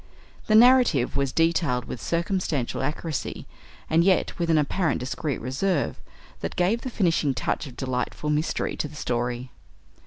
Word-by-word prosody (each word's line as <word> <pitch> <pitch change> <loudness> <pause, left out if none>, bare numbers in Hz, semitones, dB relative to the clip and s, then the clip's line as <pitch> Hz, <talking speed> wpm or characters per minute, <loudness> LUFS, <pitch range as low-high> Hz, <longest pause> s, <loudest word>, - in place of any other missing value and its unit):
The 215 - +4
narrative 240 - +5
was 140 -1 0
detailed 165 -6 +1
with 125 - -7
circumstantial 170 -8 -1
accuracy, 150 +2 -3 0.4
and 165 +1 +3
yet 185 0 +2
with 170 -1 0
an 160 - +4
apparent 150 0 +1
discreet 140 +2 -3
reserve, 135 - -1 0.4
that - - -4
gave 195 +7 +1
the 260 - -4
finishing 165 - +1
touch 145 - -2
of 125 - -12
delightful 130 +3 -2
mystery 150 +2 -1
to - - -2
the 150 - -13
story. 125 -2 -2
155 Hz, 150 wpm, -25 LUFS, 130-175 Hz, 0.4 s, narrative